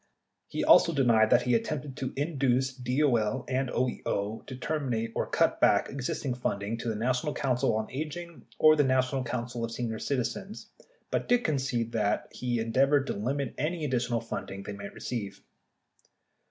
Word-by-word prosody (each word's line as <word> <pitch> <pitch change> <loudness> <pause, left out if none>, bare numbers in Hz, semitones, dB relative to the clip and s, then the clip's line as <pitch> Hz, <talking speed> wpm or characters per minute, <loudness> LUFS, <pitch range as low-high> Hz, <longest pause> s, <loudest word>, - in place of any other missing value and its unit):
He - - -3
also 170 - +6
denied 115 -5 +4
that 125 0 +5
he 125 - +1
attempted 135 +3 -1
to 130 - -3
induce 135 -3 +1
DOL 125 -3 +1
and 130 0 0
OEO 110 -4 -2
to 130 - -6
terminate 125 -5 -2
or - - -1
cut - - +2
back - - +4
existing 135 0 -3
funding 115 -2 -2
to 115 - -3
the 110 - -1
National 125 +6 0
Council 130 -3 +1
on 110 0 -3
Aging 160 +4 -6
or 155 0 +7
the 150 - +4
National 130 0 +1
Council 120 -1 -3
of 115 - -3
Senior 115 -2 -3
Citi 135 -3 0
zens, 200 - -5 0.5
but - - -1
did 245 0 +3
concede 130 - -1
that 105 -2 0
he 120 -2 -1
endeavored 135 +5 +3
to - - -2
limit 135 +5 -2
any 155 +2 -1
additional 120 -3 0
funding 100 -3 -6
they 105 - -6
might 100 0 -8
receive. 105 -5 -5
125 Hz, 165 wpm, -29 LUFS, 115-140 Hz, 0.5 s, or